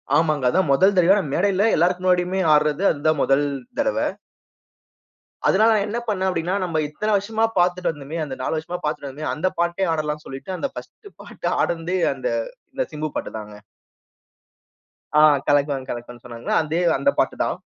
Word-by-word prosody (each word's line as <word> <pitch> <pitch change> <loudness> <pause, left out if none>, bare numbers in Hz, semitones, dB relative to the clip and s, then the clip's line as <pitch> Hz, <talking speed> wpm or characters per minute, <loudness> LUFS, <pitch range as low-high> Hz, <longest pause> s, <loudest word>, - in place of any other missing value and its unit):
ஆமாங்க. 155 -3 +2
அதான் 180 0 +1
மொதல் 190 +9 +4
தடவயா 185 +3 +5 0.2
மேடையில 200 +3 +2
எல்லாருக்கும் 180 +2 +1
முன்னாடியுமே 180 +1 +2
ஆட்றது. 150 +4 +2
அதுதான் 155 0 0
மொதல் 135 +2 +3 0.3
தடவ. 275 -1 +1 1.5
அதனால 215 +3 +4
நான் 205 -2 +1
என்ன 225 +3 -3
பண்னேன் 190 -3 0
அப்படின்னா, 175 0 -1
நம்ம 170 -3 -2
இத்தன 210 +9 -3
வருஷமா 220 +3 -1
பாத்துட்டு 180 0 +2
வந்தோமே, 150 +1 -7
அந்த 135 - -6
4 145 - -1
வருஷமா 175 +3 -4
பாத்துட்டு 145 -2 -3
வந்தோமே, 145 +3 -5
அந்த 175 +5 -1
பாட்டே 175 +2 +1
ஆடலான்னு 150 -1 -3
சொல்லிட்டு 135 +8 -7
அந்த 280 - -2
பர்ஸ்ட்டு 410 - -11
பாட்டு - - -5
ஆடுனதே, 170 +2 -1 0.2
அந்த - - -3 0.5
அந்த 260 - +1
சிம்பு 155 +1 -3
பாட்டு - - -4
தாங்க. 105 -1 -10 1.6
ஆ, - - +6 0.3
கலக்குவேன் 140 -2 +1
கலக்குவேன் 120 0 -7
சொன்னங்கள்ல. 120 -1 -5
அதே 160 +3 -1 0.2
அந்த 280 - +2
பாட்டு - - +1
தான். - - -2
165 Hz, 160 wpm, -22 LUFS, 145-190 Hz, 1.6 s, ஆ